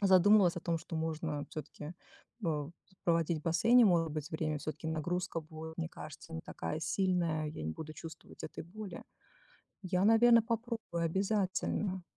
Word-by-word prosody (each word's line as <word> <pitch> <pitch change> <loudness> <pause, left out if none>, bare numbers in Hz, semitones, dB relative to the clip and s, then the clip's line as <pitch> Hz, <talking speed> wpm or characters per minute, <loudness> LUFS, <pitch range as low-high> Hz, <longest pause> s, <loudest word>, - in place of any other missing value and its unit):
задумывалась 190 -1 +6
о - - -2
том, 165 0 0
что 165 0 -6
можно 160 -2 -2
всё-таки, 155 +1 -7 0.5
э, 150 -3 -1 0.3
проводить 165 -1 +2
в - - -21
бассейне, 230 +10 +5
может 170 -5 +4
быть, 150 -1 -4
время, 155 -1 -1
всё-таки 155 +2 -5
нагрузка 170 +2 -1
будет, 160 +1 -9
мне 165 -1 -1
кажется, 155 0 -10
не 165 - -3
такая 160 0 -4
сильная 170 -3 +1
и - - -4
я - - -6
не 80 - -2
буду 155 - -7
чувствовать 160 +1 -10
этой - - -6
боли. 195 +1 -8 0.8
Я, 185 0 +1
наверно, 230 +2 +7
попробую 225 -6 -2
обязательно. 190 +1 0
170 Hz, 160 wpm, -33 LUFS, 160-190 Hz, 0.8 s, наверно